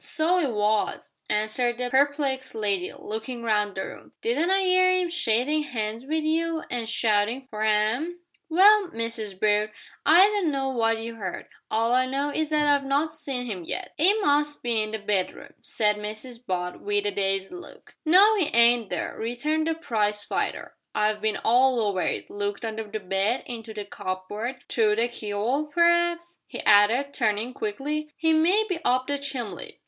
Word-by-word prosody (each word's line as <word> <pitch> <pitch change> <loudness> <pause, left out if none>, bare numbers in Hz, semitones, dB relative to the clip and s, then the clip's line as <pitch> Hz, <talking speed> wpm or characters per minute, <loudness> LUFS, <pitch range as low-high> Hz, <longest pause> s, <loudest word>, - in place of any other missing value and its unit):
"So 340 +3 +1
'e 295 - +1
was," 210 -2 -1 0.2
answered 215 +3 0
the 250 0 -3
perplexed 275 -2 0
lady, 200 -4 -1
looking 225 +3 -6
round 210 -3 0
the 190 - -3
room; - - -12
"didn't 285 +10 +1
I 385 +1 +3
'ear 370 0 +4
'im 365 -1 +1
a - - -10
shakin' 295 0 +1
'ands 225 -1 -4
wi' 310 - -1
you, 325 +1 0
an' 245 - 0
a - - -6
shoutin' 225 +3 +1
for 215 -1 -5
'am?" 220 +11 +1 0.3
"Well, 395 +4 +6
Mrs 225 - -4
Brute, 210 0 +2 0.3
I 335 +6 +7
dun 410 -5 +1
know 270 -2 -1
what 225 -2 +1
you 230 +1 -7
'eard; 190 -4 -6 0.2
all 225 +2 +1
I 255 +1 +3
know 280 +2 -1
is 310 0 -1
that 300 -1 +2
I've 285 -1 +3
not 285 +3 0
seed 265 -5 -4
'im 185 -4 -6
yet." - - -5
"'E 350 +6 +6
must 295 -3 +1
be 235 -2 +2
in 215 - -2
the 220 - -3
bedroom," 200 -3 -2
said 210 -1 +1
Mrs 215 +4 -7
Butt, 180 -4 -4
with 205 0 -1
a 205 - +1
dazed 195 -1 -1
look. 360 - -12
"No 380 +7 +6
'e 360 -7 +1
ain't 235 -2 +5
there," - - -3
returned 300 +8 -2
the 325 - 0
prize 210 -8 -1
fighter; - - -3 0.2
"I've 210 0 +1
bin 215 -1 0
all 250 +2 +3
over 200 -4 0
it - - -1
looked 205 +2 -3
under 220 0 -4
the 215 +1 -5
bed, 195 +5 0
into 230 -2 -7
the 210 -1 -6
cupboard, 205 +7 -5
through 215 -3 +2
the 230 +2 +1
key'ole; 235 +6 -2
p'r'aps," 345 +1 +1
he - - -7
added, 225 +7 +4
turning 225 0 0
quickly, 305 - -3
"'e 320 0 +4
may 360 +8 +3
be 365 -5 -2
up 255 +1 +2
the 285 0 -2
chimbly!" 265 -6 -5
240 Hz, 185 wpm, -25 LUFS, 215-300 Hz, 0.3 s, I